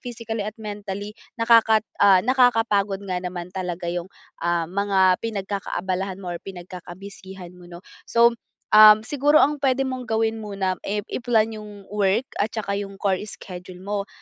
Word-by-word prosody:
physically 230 Hz, -3 st, -5 dB
at 210 Hz, +2 st, -5 dB
mentally, 205 Hz, -1 st, -6 dB, 0.2 s
nakakat 230 Hz, -2 st, +4 dB, 0.2 s
ah, 190 Hz, -1 st, +6 dB
nakakapagod 225 Hz, -6 st, +2 dB
nga 185 Hz, -2 st, -3 dB
naman 180 Hz, -1 st, -6 dB
talaga 180 Hz, -2 st, -4 dB
yung, 175 Hz, +1 st, -4 dB, 0.3 s
ah, 170 Hz, 0 st, 0 dB
mga 190 Hz, -1 st, +2 dB
pinagkakaabalahan 195 Hz, -3 st, -3 dB
mo 180 Hz, -, -5 dB
or 175 Hz, -, -4 dB
pinagkaka-busy-han 185 Hz, 0 st, -10 dB
mo 175 Hz, -, -14 dB
'no. 175 Hz, 0 st, -11 dB, 0.3 s
So, 235 Hz, 0 st, +5 dB, 0.4 s
um, 215 Hz, 0 st, +8 dB
siguro 290 Hz, +5 st, +3 dB
ang 295 Hz, +1 st, +2 dB
pwede 270 Hz, -1 st, +1 dB
mong 255 Hz, -2 st, -4 dB
gawin 225 Hz, 0 st, 0 dB
muna, 195 Hz, -3 st, -3 dB
eh, 205 Hz, +1 st, -1 dB
i-plan 225 Hz, -2 st, +1 dB
yung 205 Hz, -2 st, -12 dB
work 205 Hz, +2 st, +1 dB, 0.2 s
at 215 Hz, +2 st, -1 dB
tsaka 200 Hz, -3 st, -2 dB
yung 200 Hz, -1 st, -6 dB
chore 195 Hz, -3 st, +1 dB
schedule 180 Hz, -2 st, -10 dB
mo. 200 Hz, +1 st, -3 dB
200 Hz, 150 wpm, -23 LUFS, 185-220 Hz, 0.4 s, um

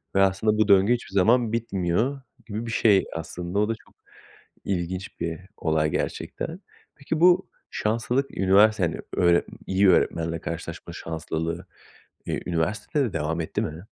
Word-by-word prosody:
ve 95 Hz, -, +5 dB
aslında 95 Hz, +3 st, +2 dB
bu 110 Hz, -, +4 dB
döngü 100 Hz, +4 st, +5 dB
hiçbir 120 Hz, -5 st, -4 dB
zaman 115 Hz, +4 st, +3 dB
bitmiyor 115 Hz, +4 st, 0 dB, 0.2 s
gibi 110 Hz, +1 st, -5 dB
bir 115 Hz, -, -4 dB
şey 105 Hz, -4 st, +4 dB
aslında. 85 Hz, +4 st, -4 dB
O 105 Hz, +1 st, +2 dB
da, -, -, +2 dB
çok -, -, -23 dB, 0.7 s
ilginç 90 Hz, 0 st, -3 dB
bir 85 Hz, 0 st, -2 dB, 0.2 s
olay 80 Hz, -1 st, +1 dB
gerçekten. 170 Hz, +4 st, -4 dB, 0.3 s
Peki, 150 Hz, +3 st, -3 dB
bu 175 Hz, +1 st, +5 dB, 0.2 s
şanslılık 120 Hz, +5 st, -1 dB
üniversitede, 95 Hz, 0 st, +5 dB
hani, 80 Hz, -, -5 dB, 0.3 s
öğre 85 Hz, 0 st, +4 dB, 0.2 s
iyi 95 Hz, +1 st, +2 dB
bir -, -, +8 dB
öğretmenle 85 Hz, 0 st, 0 dB
karşılaşma 85 Hz, 0 st, -6 dB
şanslılığı, 80 Hz, +2 st, -4 dB, 0.6 s
iii, -, -, -2 dB
üniversitede 105 Hz, -, 0 dB
de 110 Hz, -, -4 dB
devam 80 Hz, +1 st, -1 dB
etti 80 Hz, -, -2 dB
mi? 80 Hz, +6 st, -6 dB
95 Hz, 150 wpm, -25 LUFS, 85-110 Hz, 0.7 s, bir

